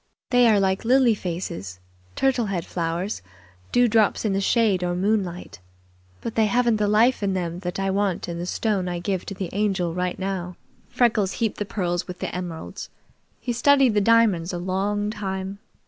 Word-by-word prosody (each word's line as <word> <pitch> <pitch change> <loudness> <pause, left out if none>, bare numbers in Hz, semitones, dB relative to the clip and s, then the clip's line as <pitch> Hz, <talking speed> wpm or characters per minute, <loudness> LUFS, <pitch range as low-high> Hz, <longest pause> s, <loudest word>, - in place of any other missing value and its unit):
They 245 -1 +5
are 215 -3 +5
like 190 -1 +1
lily 250 0 +4
faces, 165 - -5 0.4
turtle 260 -4 +1
head 180 -4 -2
flowers, 170 +4 -3 0.5
dewdrops 230 -3 +3
in 205 - +1
the 195 - 0
shade 200 -3 +2
or 175 0 -1
moonlight; 185 - -1 0.6
but 230 - -4
they 220 -1 +3
haven't 235 +1 +2
the 210 -1 +1
life 220 +5 +3
in 195 -2 0
them 175 -1 -3
that 180 0 -4
I 195 0 0
want 195 -2 -1
in 170 -1 -4
the 175 - -4
stone 200 -2 -1
I 175 - -3
give 180 +1 -3
to 195 - -5
the 185 -2 -5
Angel 195 -4 0
right 180 0 -2
now." 185 -2 -4 0.3
Freckles 215 -5 +2
heaped 225 -2 -2
the 205 - -1
pearls 175 -4 -2
with 180 -1 -7
the - - -4
emeralds. 175 -3 -6 0.5
He 245 - -3
studied 270 0 +4
the 210 - +3
diamonds 205 -6 +3
a 175 - -3
long 200 +3 -1
time. 195 -2 -4
195 Hz, 180 wpm, -24 LUFS, 180-220 Hz, 0.6 s, They